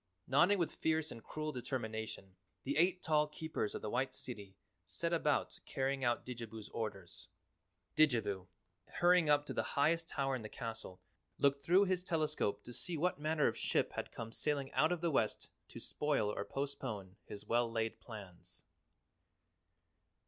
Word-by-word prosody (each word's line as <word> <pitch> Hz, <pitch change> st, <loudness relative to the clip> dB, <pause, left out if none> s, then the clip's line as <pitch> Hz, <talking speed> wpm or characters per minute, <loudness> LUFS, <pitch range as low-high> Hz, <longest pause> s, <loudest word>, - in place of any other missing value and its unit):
Nodding 175 Hz, +10 st, +5 dB
with 170 Hz, -4 st, 0 dB
fierce 160 Hz, -1 st, 0 dB
and 115 Hz, -, -9 dB
cruel 155 Hz, 0 st, -3 dB
determination, 110 Hz, -6 st, -4 dB, 0.3 s
the 140 Hz, -, -1 dB
eight 180 Hz, +3 st, +3 dB
tall 150 Hz, -1 st, +3 dB
Keepers 150 Hz, -7 st, -3 dB
of -, -, -5 dB
the 105 Hz, -, -2 dB
White 130 Hz, +1 st, 0 dB
City 100 Hz, -6 st, -6 dB, 0.3 s
set 165 Hz, -, -2 dB
about 150 Hz, -3 st, +1 dB
carrying 135 Hz, 0 st, 0 dB
out 120 Hz, -1 st, +1 dB
Didjabo's 115 Hz, -3 st, -6 dB
orders. 100 Hz, -6 st, -5 dB, 0.7 s
Didjabo, 105 Hz, -11 st, +3 dB, 0.4 s
hurrying 175 Hz, -2 st, +4 dB
up 145 Hz, 0 st, +5 dB
to -, -, -4 dB
the -, -, +1 dB, 0.2 s
highest 165 Hz, +3 st, +3 dB
tower 135 Hz, -1 st, 0 dB
in 125 Hz, -, -4 dB
the 110 Hz, -, -6 dB
castle, 110 Hz, -5 st, -6 dB, 0.4 s
looked 140 Hz, 0 st, +3 dB
through 180 Hz, +6 st, +6 dB
his 185 Hz, -1 st, +1 dB
telescope 155 Hz, -, 0 dB
to 120 Hz, -, -9 dB
see 170 Hz, +6 st, -2 dB
what 175 Hz, -1 st, +1 dB
manner 155 Hz, 0 st, +2 dB
of -, -, +2 dB
ship -, -, +1 dB
had -, -, -4 dB
come 115 Hz, 0 st, -6 dB
sailing 140 Hz, +1 st, 0 dB
out 155 Hz, +3 st, +4 dB
of 175 Hz, -2 st, 0 dB
the 170 Hz, -1 st, +2 dB
west 110 Hz, -6 st, +1 dB, 0.2 s
to -, -, -9 dB
spoil 145 Hz, -8 st, +1 dB
or 100 Hz, -, -3 dB
postpone 110 Hz, -7 st, -4 dB
his 100 Hz, -, -7 dB
well 120 Hz, 0 st, +2 dB
laid 115 Hz, -1 st, -1 dB
plans. 90 Hz, -6 st, -9 dB
135 Hz, 165 wpm, -36 LUFS, 110-155 Hz, 0.7 s, through